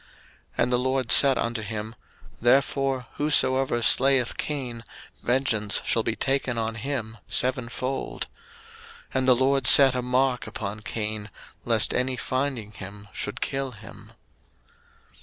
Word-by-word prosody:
01:004:015 -, -, +1 dB
And -, -, -1 dB
the 125 Hz, -, +2 dB
LORD 130 Hz, -1 st, -1 dB
said 135 Hz, -3 st, +7 dB
unto 115 Hz, -1 st, -2 dB
him, 110 Hz, +1 st, -6 dB, 0.5 s
Therefore 135 Hz, +1 st, +1 dB
whosoever 135 Hz, -4 st, +1 dB
slayeth 130 Hz, 0 st, +3 dB
Cain, 125 Hz, -6 st, -4 dB, 0.4 s
vengeance 120 Hz, -5 st, +1 dB
shall 115 Hz, -, +1 dB
be 110 Hz, 0 st, -2 dB
taken 135 Hz, -2 st, -1 dB
on 115 Hz, 0 st, -2 dB
him 110 Hz, -2 st, -5 dB
sevenfold. 125 Hz, +1 st, -2 dB, 0.9 s
And 130 Hz, 0 st, 0 dB
the 130 Hz, -, +6 dB
LORD 135 Hz, 0 st, +2 dB
set 135 Hz, -2 st, +9 dB
a 125 Hz, -, -2 dB
mark 125 Hz, +1 st, 0 dB
upon 105 Hz, -1 st, -6 dB
Cain, 110 Hz, -1 st, -4 dB, 0.4 s
lest 115 Hz, -2 st, +2 dB
any 130 Hz, 0 st, -1 dB
finding 130 Hz, -5 st, -3 dB
him 100 Hz, +1 st, -11 dB
should -, -, -3 dB
kill 135 Hz, -1 st, -3 dB
him. 110 Hz, -1 st, -14 dB
125 Hz, 130 wpm, -25 LUFS, 110-135 Hz, 0.9 s, set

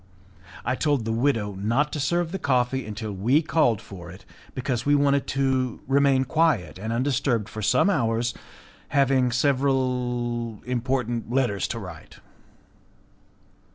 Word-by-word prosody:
I 125 Hz, -, +1 dB
told 140 Hz, -3 st, 0 dB
the 115 Hz, -, -1 dB
widow 115 Hz, -4 st, 0 dB
not 115 Hz, +10 st, 0 dB
to 150 Hz, -, -2 dB
serve 170 Hz, +4 st, 0 dB
the 195 Hz, -, -3 dB
coffee 130 Hz, -3 st, 0 dB
until 110 Hz, 0 st, -5 dB
we 120 Hz, -, +2 dB
called 150 Hz, -9 st, +2 dB
for 90 Hz, -3 st, -10 dB
it, 95 Hz, +2 st, -12 dB, 0.3 s
because 125 Hz, -2 st, -2 dB
we 145 Hz, +2 st, +3 dB
wanted 140 Hz, -1 st, +2 dB
to 130 Hz, -3 st, 0 dB
remain 135 Hz, -1 st, +3 dB
quiet 130 Hz, -, +1 dB
and 110 Hz, +3 st, -4 dB
undisturbed 125 Hz, -3 st, 0 dB
for 110 Hz, -, -7 dB
some 125 Hz, -, +3 dB
hours, 120 Hz, -, +1 dB, 0.5 s
having 135 Hz, -3 st, +2 dB
several 125 Hz, -3 st, 0 dB
important 120 Hz, -2 st, -2 dB
letters 120 Hz, -6 st, +1 dB
to 115 Hz, -, -4 dB
write. 90 Hz, -7 st, -10 dB
125 Hz, 135 wpm, -25 LUFS, 115-140 Hz, 0.5 s, we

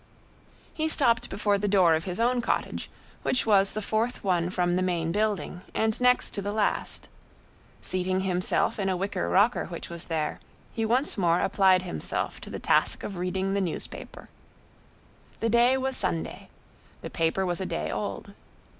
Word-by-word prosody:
He 315 Hz, 0 st, -1 dB
stopped 235 Hz, -7 st, +2 dB
before 200 Hz, 0 st, +1 dB
the 205 Hz, -, -1 dB
door 185 Hz, -4 st, +5 dB
of 160 Hz, +1 st, 0 dB
his 180 Hz, +1 st, -4 dB
own 245 Hz, +1 st, +2 dB
cottage, 230 Hz, -, -2 dB, 0.3 s
which 255 Hz, -, 0 dB
was 200 Hz, -3 st, +4 dB
the 215 Hz, -, -3 dB
fourth 225 Hz, +4 st, -1 dB
one 175 Hz, -3 st, +1 dB
from 175 Hz, -1 st, +1 dB
the 185 Hz, -, +1 dB
main 170 Hz, -3 st, 0 dB
building 205 Hz, -4 st, -1 dB
and 220 Hz, +2 st, 0 dB
next 250 Hz, 0 st, +3 dB
to 200 Hz, -, -3 dB
the 200 Hz, +1 st, -3 dB
last. 210 Hz, -1 st, -1 dB, 0.8 s
Seating 185 Hz, 0 st, 0 dB
himself 185 Hz, +2 st, 0 dB
in 195 Hz, -1 st, 0 dB
a 185 Hz, -, 0 dB
wicker 195 Hz, 0 st, -2 dB
rocker 210 Hz, +6 st, +3 dB
which 170 Hz, -1 st, -7 dB
was 170 Hz, 0 st, -6 dB
there, 155 Hz, -2 st, -2 dB, 0.3 s
he 225 Hz, -, -1 dB
once 245 Hz, +1 st, +1 dB
more 170 Hz, -1 st, +3 dB
applied 190 Hz, -2 st, +4 dB
himself 180 Hz, -, -3 dB
to -, -, -9 dB
the -, -, -5 dB
task -, -, +1 dB
of 200 Hz, -, -5 dB
reading 185 Hz, +2 st, -1 dB
the 200 Hz, -, +1 dB
newspaper. 175 Hz, -4 st, -6 dB, 1.1 s
The 230 Hz, -, 0 dB
day 240 Hz, +3 st, +5 dB
was 265 Hz, 0 st, -2 dB
Sunday; 80 Hz, -, -3 dB, 0.5 s
the -, -, -7 dB
paper 165 Hz, +4 st, 0 dB
was 175 Hz, +1 st, -2 dB
a 190 Hz, -, -2 dB
day 75 Hz, +1 st, -3 dB
old. -, -, -4 dB
195 Hz, 170 wpm, -27 LUFS, 180-220 Hz, 1.1 s, door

